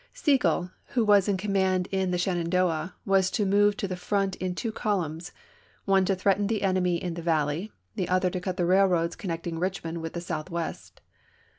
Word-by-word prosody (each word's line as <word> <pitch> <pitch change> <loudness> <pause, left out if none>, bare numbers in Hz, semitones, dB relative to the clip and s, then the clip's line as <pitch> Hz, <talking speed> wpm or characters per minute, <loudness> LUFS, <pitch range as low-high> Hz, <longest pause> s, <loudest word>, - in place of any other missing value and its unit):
Sigel, 255 - +1 0.2
who 235 -3 +3
was 205 -2 +5
in 200 -2 +1
command 190 -2 +1
in 190 -1 0
the 180 - 0
Shenandoah, 175 -2 0
was 190 -1 +3
to 210 - 0
move 205 +1 +3
to 205 - -2
the 185 - -3
front 195 +1 -1
in 185 -1 -3
two 225 +4 -3
columns, 175 -7 -2 0.5
one 195 -1 +3
to 195 - +1
threaten 195 +2 +1
the 215 -1 -1
enemy 185 -2 +2
in 175 0 -4
the 170 - -6
valley, 160 +4 0 0.2
the 180 - -3
other 185 0 +2
to 185 - -3
cut 185 0 -3
the 175 - +1
railroads 180 -2 +3
connecting 165 -3 -4
Eichmond 175 -2 -3
with 165 0 -5
the 170 - -3
Southwest. 170 0 -5
185 Hz, 185 wpm, -27 LUFS, 170-195 Hz, 0.5 s, was